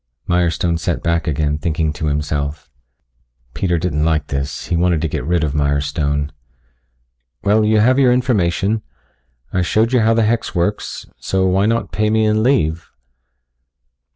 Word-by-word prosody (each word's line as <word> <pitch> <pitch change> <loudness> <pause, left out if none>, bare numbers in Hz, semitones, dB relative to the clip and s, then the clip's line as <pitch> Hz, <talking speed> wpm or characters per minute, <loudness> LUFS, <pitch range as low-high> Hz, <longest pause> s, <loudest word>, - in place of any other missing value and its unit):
Mirestone 85 -1 +1
sat - - -2
back 85 0 0
again 75 0 0
thinking 80 -1 -1
to 75 +1 -3
himself. 75 -1 -3 0.8
Peter 90 -3 0
didn't 80 -3 -1
like 80 -2 0
this. 70 0 -3
He 90 - -1
wanted 85 -1 +2
to - - +1
get 70 - -4
rid 85 +2 0
of 75 -3 -1
Mirestone. 75 0 0 1.1
"Well, 105 +2 +3
you 110 0 +3
have 130 +4 +4
your 130 -3 +5
information. 105 -4 +1 0.7
I 90 - +1
showed 110 +7 +1
you 125 - +4
how 115 0 +3
the 115 - +3
hex 115 -1 -1
works. 90 +4 -2
So, 95 0 -1
why 95 +2 +2
not 115 +1 -1
pay 105 0 0
me 110 0 +2
and 110 0 +2
leave?" 85 - +1
85 Hz, 155 wpm, -18 LUFS, 75-110 Hz, 1.1 s, your